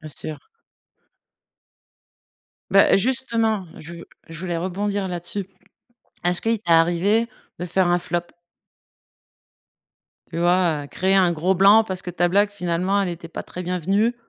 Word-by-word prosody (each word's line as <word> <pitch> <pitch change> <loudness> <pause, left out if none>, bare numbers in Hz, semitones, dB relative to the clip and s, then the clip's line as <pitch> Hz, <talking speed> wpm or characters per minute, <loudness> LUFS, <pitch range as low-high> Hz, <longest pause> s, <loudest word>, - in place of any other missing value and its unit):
Bien 155 - -9
sûr. 155 +1 -8 2.2
Bah 195 +1 +5
justement, 225 -3 0
je 170 +3 -10 0.3
je 165 0 -9
voulais 175 -2 -3
rebondir 195 +3 -2
là-dessus. 175 +2 -4 0.8
Est-ce 175 0 +2
qu'il 225 0 0
t'est 175 -5 0
arrivé 175 +8 +3 0.3
de 175 - -4
faire 180 +1 +1
un 175 0 +3
flop? 175 0 -2 2.1
Tu 165 - -5
vois, 175 -4 +2
heu, - - -9
créer 190 +6 0
un 185 -3 +4
gros 175 +4 0
blanc 200 +4 +6
parce 185 -3 -4
que 180 - -5
ta 175 0 +1
blague 200 +3 +2
finalement 185 0 -1
elle 195 - -1
était 170 -1 -7
pas - - -6
très 180 - -8
bienvenue, 195 +6 0
180 Hz, 145 wpm, -22 LUFS, 170-200 Hz, 2.2 s, blanc